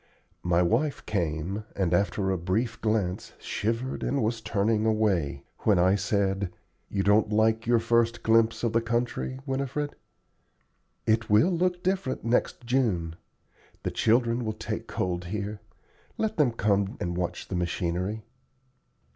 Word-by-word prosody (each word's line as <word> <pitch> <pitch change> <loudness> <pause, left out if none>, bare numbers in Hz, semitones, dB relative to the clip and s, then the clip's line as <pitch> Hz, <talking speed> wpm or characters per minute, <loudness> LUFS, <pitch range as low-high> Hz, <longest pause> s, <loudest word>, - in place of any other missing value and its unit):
My 90 0 +2
wife 130 - 0
came, 90 +2 -2
and 90 -3 0
after 95 +1 +1
a 95 - 0
brief 100 +8 -1
glance 105 -5 -1
shivered 115 +5 -2
and 140 -3 0
was 115 +1 -1
turning 110 0 +1
away, 100 -11 +1 0.2
when 105 -3 +3
I 90 +2 +4
said, 100 -1 0 0.4
"You 100 -1 0
don't 105 +2 +4
like 110 +1 +2
your 120 0 +5
first 115 0 +1
glimpse 115 0 +3
of 115 - +1
the 115 - +3
country, 120 +2 -1
Winifred?" 140 +2 -2 1.1
"It 110 0 +2
will 105 - +5
look 180 +1 0
different 185 -8 -1
next 120 +1 0
June. 105 -11 0 0.7
The - - -1
children 115 +1 +2
will 110 -1 -2
take 110 - -5
cold 90 -1 -2
here. 105 +2 -4 0.6
Let 220 0 -1
them 145 -6 +4
come 100 -3 +1
and 85 0 -2
watch 90 0 -3
the 95 - -4
machinery." 90 +4 -2
110 Hz, 140 wpm, -27 LUFS, 95-115 Hz, 1.1 s, your